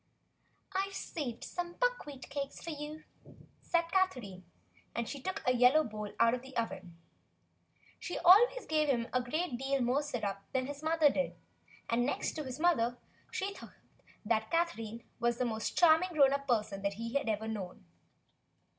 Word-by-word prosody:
"I've 390 +1 -1
saved 255 -8 -4
some 350 -1 -4
buckwheat - - -2
cakes 280 -1 -4
for 335 - -6
you," 300 +1 -7 0.6
said 340 -1 +2
Catherine, 250 - 0 0.5
and 235 -1 -1
she 280 - -6
took 375 +7 -4
a 250 - +4
yellow 250 +5 +6
bowl 215 -4 -6
out 230 0 +5
of 250 - -2
the 265 0 -9
oven. 190 -7 -4 1.0
She 355 - -4
always 445 +6 +6
gave 310 -1 +1
him 235 -3 +1
a 255 - +3
great 285 +2 -2
deal 270 +1 0
more 250 +4 +2
syrup 220 -9 -3
than 260 -1 +1
his 285 +1 -6
mother 315 -2 +4
did, 275 - -1 0.5
and 235 +1 +2
next 270 - -1
to 310 - -5
his 260 0 -6
mother 245 -9 +2 0.3
he 395 +1 -2
thought - - -12 0.7
Catherine 235 -10 -1 0.2
the 240 +1 +1
most 220 -2 -3
charming 345 +1 +6
grown 275 -3 +5
up 280 0 -2
person 210 -5 0
he 220 +4 -3
had 280 -5 0
ever 220 +1 -1
known. 195 - -6
270 Hz, 160 wpm, -33 LUFS, 230-320 Hz, 1.0 s, yellow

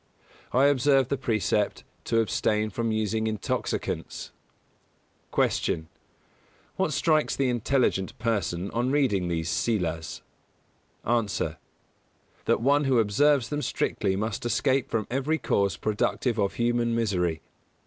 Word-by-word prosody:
I 130 +2 +4
observe 135 -1 +3
the - - +1
precept 110 -5 0 0.2
to 115 -1 +2
abstain 110 0 0
from 115 +2 -1
using 110 0 0
intoxicants. 110 -2 -3 1.0
154. - - +1
Q. 80 -1 -11 0.9
What - - 0
strikes 155 +2 +2
the 135 -2 +1
intelligent 120 -5 0
person 100 -5 -1
on 120 +2 0
reading 130 -11 +2
these 80 -2 -2
Sīlas? 85 -8 -1 0.8
A. 115 -4 0 0.9
That - - +2
one 140 +3 +3
who 135 -2 +3
observes 120 +4 +3
them 145 0 -2
strictly 100 -8 -1
must 105 +1 -3
escape 130 +3 +1
from 110 -2 -1
every 135 +5 0
cause 100 - 0
productive 110 +2 0
of 100 -1 0
human 120 0 +1
misery. 90 -8 0
115 Hz, 120 wpm, -27 LUFS, 100-130 Hz, 1.0 s, I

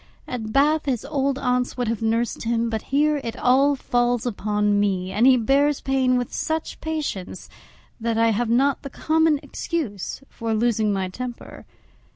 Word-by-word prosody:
At 225 -3 -5
Bath 295 +5 +3
his 255 -5 -1
old 275 -1 0
aunts 250 -2 -1
would 245 -2 -1
have 230 -1 -2
nursed 225 +1 0
him, 230 0 0
but 220 -1 -2
here 295 +1 +2
it 230 +1 -5
all 275 +3 +3
falls 245 -1 0
upon 210 -2 0
me; 190 -2 0
and 220 +6 +3
he 260 -1 +6
bears 275 +5 +2
pain 260 -2 +1
with 245 -1 -3
such 320 0 -3
patience 295 - -4 0.5
that 230 0 -1
I 230 0 +4
have 225 +2 -1
not 270 +4 +2
the 275 - -7
common 315 +1 +2
excuse 275 - -4
for 225 -1 -3
losing 220 -2 +1
my 190 -2 -1
temper. 240 +6 -8
245 Hz, 170 wpm, -23 LUFS, 220-275 Hz, 0.5 s, he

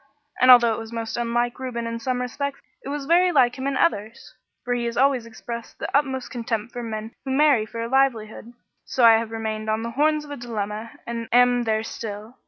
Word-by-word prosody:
And 255 - +5
although 240 -2 +8
it - - -4
was 225 0 -8
most 230 -1 -4
unlike 240 +1 -1
Reuben 245 -3 -4
in 230 0 -4
some 250 0 -2
respects, 280 +3 -4 0.2
it - - -6
was 285 -1 -4
very 350 +4 +4
like 255 -6 +3
him 265 - -2
in 275 -1 -1
others; 215 -7 -1 0.3
for 245 - 0
he 240 -1 -1
has 235 0 -3
always 260 -3 +2
expressed 235 +1 -8
the - - -4
utmost 265 -3 0
contempt 230 -1 -3
for 245 - -5
men 220 -1 -5
who 270 - -6
marry 265 -5 +3
for 230 +1 -6
a - - -3
livelihood. 235 -4 0 0.3
So 250 - +2
I 225 -1 +8
have 230 -1 -4
remained 220 -1 -4
on 220 +1 0
the 235 - -4
horns 300 +3 +1
of 290 - -11
a 285 - -5
dilemma 220 -2 -4 0.2
and 235 -1 -5
am 245 0 +4
there 220 -1 0
still. 220 +2 -7
235 Hz, 220 wpm, -23 LUFS, 225-260 Hz, 0.3 s, although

